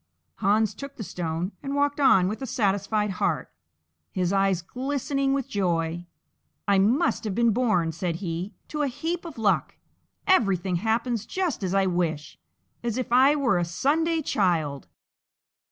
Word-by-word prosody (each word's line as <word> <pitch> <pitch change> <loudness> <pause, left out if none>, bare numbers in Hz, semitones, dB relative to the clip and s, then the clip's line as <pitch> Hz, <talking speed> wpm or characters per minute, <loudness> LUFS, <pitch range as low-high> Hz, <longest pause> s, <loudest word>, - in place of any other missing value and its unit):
Hans 215 +1 +2
took 280 +5 -9
the 225 - -6
stone 170 0 -3
and 280 0 -3
walked 285 0 +1
on 225 -10 +5
with 215 +6 -4
a 265 - -3
satisfied 210 -2 0
heart, 160 - 0 0.6
his 180 0 0
eyes 195 -3 +2
glistening 275 - -1
with 275 -2 0
joy. 175 -3 -1 0.6
"I 200 -1 +4
must 240 - +2
have 210 -4 -3
been 235 -1 +3
born," 205 -8 +1
said 170 +1 -3
he, 175 +3 -4
"to 300 - -2
a 290 - +2
heap 330 +7 -3
of 330 -6 -8
luck; 210 -4 +1 0.5
everything 195 - +2
happens 225 +2 -1
just 365 - -2
as 185 0 -1
I 195 -1 +3
wish, 165 -4 -2 0.4
as 235 -1 -2
if 255 -2 -3
I 265 +4 +6
were 265 -11 +2
a - - +1
Sunday 315 - +1
child." 160 - 0
210 Hz, 155 wpm, -26 LUFS, 180-270 Hz, 0.6 s, I